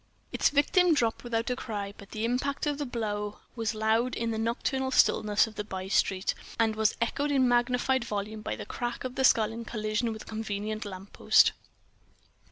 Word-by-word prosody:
Its - - +3
victim 330 +4 +4
dropped 230 -5 0
without 235 0 -1
a - - 0
cry, 205 -5 -5
but 200 - -13
the 215 +1 -3
impact 255 +5 -1
of 295 -1 -1
the 290 - -2
blow 210 -3 -3 0.2
was 225 -2 -2
loud 220 +3 +1
in 230 0 -1
the 220 - -2
nocturnal 260 +4 -1
stillness 210 -5 +3
of 220 - -10
that 210 0 -6
bystreet, 190 0 0 0.3
and 225 -1 +2
was 220 -1 +2
echoed 280 +5 0
in 270 -3 +3
magnified 245 +1 +2
volume 215 -1 -4
by - - -3
the - - -7
crack 240 0 -4
of 255 0 -5
a - - +2
skull 225 -4 +4
in 230 +1 -6
collision 215 +1 -2
with 220 -1 -7
a - - -20
convenient 215 -1 -4
lamppost. 195 0 +3
225 Hz, 185 wpm, -29 LUFS, 215-250 Hz, 0.3 s, victim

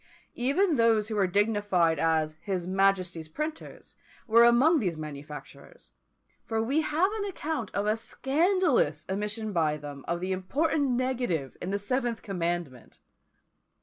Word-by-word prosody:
Even 290 +7 +1
those 225 -2 +3
who 220 - -3
were 195 -2 +2
dignified 200 -5 +2
as 160 -1 +1
"his 185 -3 -3
Majesty's 185 -3 +1
Printers" 305 - -6 0.3
were 230 +1 +6
among 260 +8 +5
these 180 - -2
manufacturers; 150 -1 -10 0.5
for 225 -1 -2
we 265 +8 +1
have 320 +6 +1
an 405 - -2
account 315 - -3
of 200 - 0
a 210 +1 +2
scandalous 275 - +1
omission 210 +2 -3
by 155 -3 +1
them 145 -2 -9
of 170 +1 -1
the 185 +1 -3
important 280 - 0
negative 245 - -1
in 180 - -4
the 200 - 0
seventh 240 +3 -2
commandment! 170 - -4
205 Hz, 140 wpm, -28 LUFS, 170-255 Hz, 0.5 s, were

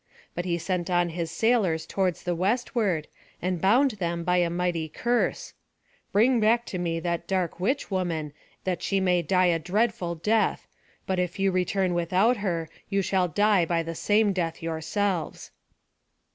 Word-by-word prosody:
But 175 - -4
he 170 -2 0
sent 175 +1 -2
on 175 -1 +2
his 165 0 -3
sailors 185 -5 +1
toward 185 0 0
the 180 - -3
westward, 200 - 0 0.3
and 180 -1 -2
bound 250 +8 +4
them 170 -5 -3
by 180 +1 +2
a 175 -1 +2
mighty 170 -2 -1
curse: 240 +9 -1 0.6
"Bring 235 +4 +4
back 230 +2 +3
to 180 - -2
me 165 -1 -1
that 170 -1 -2
dark 185 -3 -1
witch 240 +6 -1
woman, 165 -6 -2 0.3
that 185 -2 -2
she 195 - 0
may 180 -2 +2
die 185 +3 +2
a 170 -2 +2
dreadful 195 0 0
death. 210 +7 +1 0.4
But 190 -1 -1
if 180 +1 -2
you 195 0 +2
return 185 0 0
without 185 +8 +2
her, 175 -5 -2 0.2
you 195 -1 +1
shall 185 -1 +1
die 205 +2 +3
by 165 0 0
the 165 0 -5
same 205 +4 +2
death 170 -3 -2
yourselves." 165 +3 -2
180 Hz, 165 wpm, -26 LUFS, 170-205 Hz, 0.6 s, bound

